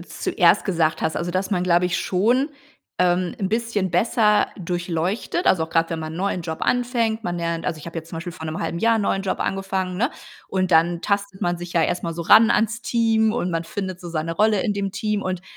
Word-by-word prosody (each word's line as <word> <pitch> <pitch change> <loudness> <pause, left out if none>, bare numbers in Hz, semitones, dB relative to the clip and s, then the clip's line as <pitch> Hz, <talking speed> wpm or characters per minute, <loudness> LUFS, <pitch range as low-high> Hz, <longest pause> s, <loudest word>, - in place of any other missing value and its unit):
zuerst - - +2
gesagt 165 -4 0
hast, 160 - 0
also 175 +1 -2
dass 185 +3 -2
man, 180 -3 +1
glaube 175 0 +3
ich, 180 - 0
schon, 240 +9 +2 0.5
ähm, 180 0 +1
'n 190 - -1
bisschen 220 -5 -1
besser 210 +3 +3
durchleuchtet, 175 - -2
also 165 -3 +4
auch 160 - -13
gerade, 165 0 +1
wenn 165 - -2
man 155 0 -5
'n - - -7
neuen 185 0 -1
Job 160 -1 -5
anfängt. 235 -3 0
Man 175 0 -2
lernt 170 -1 -3
also 160 - -1
ich 150 - -11
hab 170 - -8
jetzt 165 -1 -6
zum 165 - -7
Beispiel 170 +2 -5
vor 160 -2 -8
'nem 155 - -4
halben 170 - -3
Jahr 230 +2 +3
'n 210 - 0
neuen 195 - 0
Job 190 - -2
angefangen, 190 -1 -2
ne? 245 +7 +1 0.4
Und 185 -1 0
dann 170 +1 +3
tastet 200 -1 -2
man 175 0 0
sich 175 0 -8
ja 165 - +4
erst 175 - -1
mal 165 -1 -3
so 170 - -4
ran 220 +6 +7
ans 225 +2 +1
Team 225 -2 +2
und 200 -6 -1
man 165 -1 -2
findet 185 0 -5
so 175 - -8
seine 165 0 -2
Rolle 210 +1 +3
in 210 - 0
dem 200 -1 -3
Team 210 -1 -1
und, 185 -1 -3
185 Hz, 240 wpm, -22 LUFS, 170-210 Hz, 0.5 s, ran